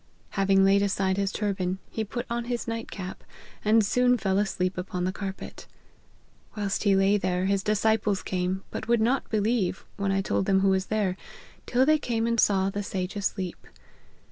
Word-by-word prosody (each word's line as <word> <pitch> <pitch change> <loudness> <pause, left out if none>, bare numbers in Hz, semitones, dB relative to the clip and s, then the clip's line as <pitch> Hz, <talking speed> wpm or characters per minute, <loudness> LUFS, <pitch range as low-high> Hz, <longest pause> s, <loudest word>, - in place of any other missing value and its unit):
Having 195 -1 +3
laid 200 +1 +4
aside 190 -1 +1
his 200 -1 0
turban, 190 -3 -1
he 220 - -2
put 240 +4 -5
on 235 0 -2
his 240 -1 -3
night 230 0 -4
cap, 185 -2 -7 0.4
and 215 0 +4
soon 250 +3 +3
fell 195 -2 +1
asleep 185 -3 -1
upon 180 0 -3
the 185 - 0
carpet. 195 0 -7 0.9
Whilst 205 -1 -1
he 200 -1 +5
lay 195 +2 +4
there, 185 -1 0
his 195 0 +1
disciples 215 -1 +1
came, 185 +1 -2
but - - -5
would 235 0 +3
not 245 +5 +1
believe, 215 -3 0
when 200 -1 0
I 195 0 +1
told 195 - -1
them 190 -1 +3
who 195 - +4
was 190 0 +1
there, 205 -4 0 0.5
till 250 +2 +3
they 310 +1 +4
came 230 -4 -1
and 230 0 +1
saw 195 -2 +3
the 205 - -3
sage 190 -1 -4
asleep. 190 -3 -3
200 Hz, 185 wpm, -27 LUFS, 190-220 Hz, 0.9 s, he